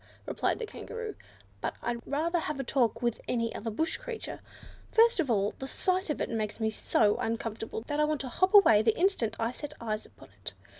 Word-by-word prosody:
replied - - 0
the 465 - -4
Kangaroo, 455 0 -6 0.5
"but - - -2
I'd 235 0 -2
rather 330 +5 +1
have 300 -3 -3
a - - -1
talk 245 -2 +1
with 235 -2 0
any 230 -2 0
other 225 - -4
bush 320 +10 -1
creature. - - -6 0.5
First 460 -2 +5
of 305 -6 +1
all, 205 -3 +2
the 265 - -5
sight 370 +4 0
of 300 - -1
it - - 0
makes 215 -1 -2
me 220 -1 +1
so 210 -1 +2
uncomfortable, 225 -1 -3
that 290 +2 -2
I - - +5
want 305 -1 -1
to 270 - -4
hop 370 - +2
away 225 - +8
the 220 0 +2
instant 335 - +2
I 230 +1 0
set 295 +3 -7
eyes 215 -2 -3
upon - - -17
it. 100 - -6
250 Hz, 210 wpm, -30 LUFS, 225-340 Hz, 0.5 s, away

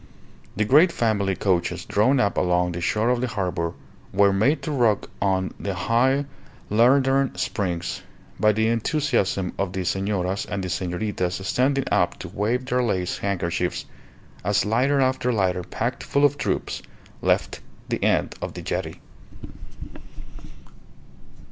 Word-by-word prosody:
The 105 - +1
great 150 - +6
family 100 - 0
coaches 90 -2 0
drawn 125 +7 +2
up 100 -5 +1
along 90 0 +1
the 85 0 -5
shore 110 +7 +1
of 125 -1 0
the 125 - 0
harbour 90 -6 -2 0.4
were 100 0 +4
made 130 +11 +2
to 155 - -3
rock 120 -7 +1
on 95 -1 0
the 100 -2 -3
high 130 +9 +2 0.5
leathern 135 +4 +3
springs 90 -4 -2 0.4
by 110 - +5
the 110 +1 +1
enthusiasm 115 - 0
of 95 -2 -1
the 95 -2 -3
senoras 95 +1 -1
and 100 -2 -3
the 90 - -3
senoritas 90 +1 -2
standing 135 +3 +1
up - - +2
to - - -8
wave 120 +5 -1
their 125 0 +1
lace 95 -7 -1
handkerchiefs, 90 -3 -2 0.6
as 100 +3 +1
lighter 130 +7 +2
after 130 -1 +1
lighter 95 -5 +1
packed 85 - -3
full 140 +1 +2
of 145 0 +3
troops - - -2 0.4
left - - +1 0.3
the - - -2
end - - +2
of - - -5
the - - -7
jetty. - - -3
105 Hz, 140 wpm, -24 LUFS, 95-125 Hz, 0.6 s, great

